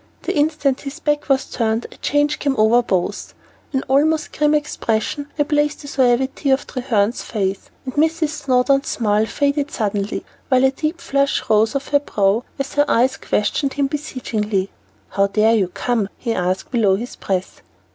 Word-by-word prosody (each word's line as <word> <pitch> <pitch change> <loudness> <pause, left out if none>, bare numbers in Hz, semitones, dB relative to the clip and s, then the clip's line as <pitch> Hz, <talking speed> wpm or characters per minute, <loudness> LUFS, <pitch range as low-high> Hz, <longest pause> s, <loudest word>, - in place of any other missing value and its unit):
The - - -2
instant 295 -3 +1
his 285 +3 -7
back 295 -2 -1
was 270 0 +3
turned, 225 0 -1
a - - -13
change 290 +1 +1
came 280 -2 0
over 220 +3 +5
both: 195 -3 -2 0.4
an 265 -1 -1
almost 305 +3 +2
grim 300 0 +3
expression 285 -1 -1
replaced 295 0 +1
the - - -8
suavity 265 +1 +1
of 265 +1 +2
Treherne's 235 -4 0
face, 195 -3 -3 0.2
and 260 - -5
Mrs. 315 +1 +1
Snowdon's 275 -2 +1
smile 215 -1 +1
faded 285 +2 0
suddenly, 205 -3 -2 0.2
while 260 -1 +4
a 265 - +5
deep 310 +5 -3
flush 280 -4 0
rose 215 +1 +4
to 275 - +1
her 285 - +5
brow, 210 -4 +1
as 275 0 -4
her 290 0 +3
eyes 255 +3 +3
questioned 270 +6 -1
his 280 -1 +1
beseechingly. 220 -9 -2 0.4
"How 195 0 +2
dared 220 +2 +3
you 190 - +1
come?" 220 +2 -1
he 235 -2 -2
asked 185 -1 -2
below 215 -6 +3
his 235 +5 -6
breath. 185 -1 -3
265 Hz, 165 wpm, -20 LUFS, 215-290 Hz, 0.4 s, over